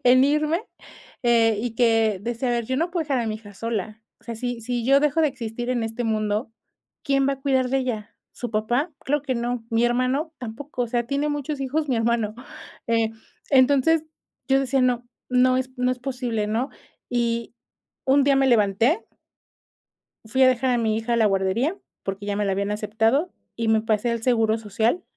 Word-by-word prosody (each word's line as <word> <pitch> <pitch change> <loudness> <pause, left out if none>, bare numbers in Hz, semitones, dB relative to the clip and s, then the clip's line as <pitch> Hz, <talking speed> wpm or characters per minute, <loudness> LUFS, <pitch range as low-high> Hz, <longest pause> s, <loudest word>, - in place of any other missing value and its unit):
en 255 +2 +6
irme, 305 +6 +1 0.6
eh, 230 -3 +3
y 235 -1 -3
que 225 -4 +3
decía: 240 +3 -2
"A - - +1
ver, 235 -1 0
yo 260 - -1
no 335 +5 0
puedo 345 -2 -1
dejar 275 -3 0
a 230 - -2
mi 215 -1 -2
hija 205 -2 -14
sola. 220 0 -4 0.2
O - - -26
sea, 235 - -5
si 245 0 -3
si 240 0 -3
yo 275 +3 +5
dejo 300 +2 +2
de 310 - +4
existir 240 -1 -5
en 245 -2 0
este 225 +2 -3
mundo, 215 0 -1 0.5
¿quién 275 -1 +2
va 275 - +1
a 270 - -19
cuidar 265 -2 +1
de 270 - +2
ella? 225 -4 -4 0.2
¿Su 245 - -6
papá? 240 +9 0
Claro 290 +1 0
que 270 -3 -2
no, 240 0 -2
¿mi 230 +1 +2
hermano? 255 +6 0
Tampoco". 250 +3 -5
O 240 - -1
sea, 240 0 -1
tiene 280 +3 0
muchos 290 -1 -3
hijos 295 +3 -1
mi 255 - +1
hermano, 225 -2 0 0.5
eh, 230 -1 +2 0.4
entonces, 285 +4 +4 0.4
yo 270 0 +4
decía: 270 0 +1
"No 245 -1 +1 0.2
no 255 0 +4
no - - +2
es 260 0 -3
no 250 0 +2
es 250 - -7
posible, 245 -5 -2
¿no?" 230 +6 -1 0.4
Y 235 -1 -1 0.5
un 275 +2 +5
día 280 -1 +4
me 270 - +3
levanté 235 - +3 1.2
fui 260 +4 +2
a - - +7
dejar 255 +1 +1
a 245 - +2
mi 220 -2 +1
hija 225 +2 -1
a - - +3
la 225 -2 +3
guardería, 200 - +1 0.3
porque, 195 +1 -4
ya 205 0 -1
me 210 - 0
la 195 - +1
habían 200 +1 -1
aceptado, 225 - +1 0.2
y 230 -1 -2
me 220 0 +4
pasé 225 +1 0
al 235 - -2
seguro 225 -2 +2
social 225 - 0
240 Hz, 205 wpm, -24 LUFS, 225-270 Hz, 1.2 s, a